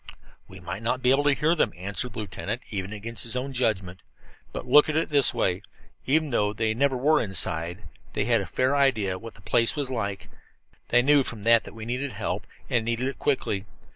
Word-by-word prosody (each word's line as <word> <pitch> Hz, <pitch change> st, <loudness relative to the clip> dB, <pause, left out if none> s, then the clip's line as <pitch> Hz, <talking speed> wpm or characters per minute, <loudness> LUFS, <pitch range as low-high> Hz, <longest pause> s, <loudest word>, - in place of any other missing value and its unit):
"We -, -, -12 dB
might 100 Hz, -, -6 dB
not 125 Hz, +3 st, -1 dB
be 125 Hz, -, +5 dB
able 140 Hz, +2 st, +3 dB
to 145 Hz, -, +5 dB
hear 155 Hz, +4 st, +2 dB
them," 130 Hz, -10 st, +1 dB
answered 100 Hz, +7 st, -3 dB
the -, -, -10 dB
lieutenant, 105 Hz, +3 st, -5 dB
even 95 Hz, -1 st, -4 dB
against 110 Hz, 0 st, -6 dB
his 115 Hz, +1 st, -1 dB
own 135 Hz, +2 st, -3 dB
judgment. 95 Hz, -7 st, -1 dB, 0.5 s
"But -, -, -6 dB
look 145 Hz, +4 st, +6 dB
at 155 Hz, -, -1 dB
it 160 Hz, -, +1 dB
this 145 Hz, -3 st, +5 dB
way. 90 Hz, 0 st, 0 dB, 0.5 s
Even 155 Hz, +2 st, +2 dB
though 105 Hz, -3 st, +1 dB
they 110 Hz, 0 st, 0 dB
never 135 Hz, +2 st, +1 dB
were 150 Hz, +5 st, +3 dB
inside 85 Hz, -4 st, -1 dB
here, 105 Hz, -, -19 dB, 0.3 s
they 105 Hz, -, 0 dB
had 115 Hz, -2 st, +3 dB
a 95 Hz, -, -6 dB
fair 130 Hz, +8 st, +1 dB
idea 120 Hz, -9 st, +2 dB
of 95 Hz, -, -9 dB
what 115 Hz, -1 st, -10 dB
the -, -, -15 dB
place 115 Hz, +3 st, +3 dB
was 140 Hz, -3 st, -2 dB
like. 100 Hz, -6 st, -3 dB, 0.6 s
They 120 Hz, 0 st, +4 dB
knew 145 Hz, +1 st, +5 dB
from 115 Hz, -5 st, -6 dB
that 115 Hz, 0 st, +5 dB
that -, -, -11 dB
we 110 Hz, -1 st, -7 dB
needed 125 Hz, +2 st, -3 dB
help, 100 Hz, 0 st, -4 dB, 0.2 s
and 120 Hz, -2 st, +1 dB
needed 115 Hz, +3 st, -1 dB
it 135 Hz, -, -9 dB
quickly. 105 Hz, -8 st, -1 dB
115 Hz, 225 wpm, -26 LUFS, 105-135 Hz, 0.6 s, look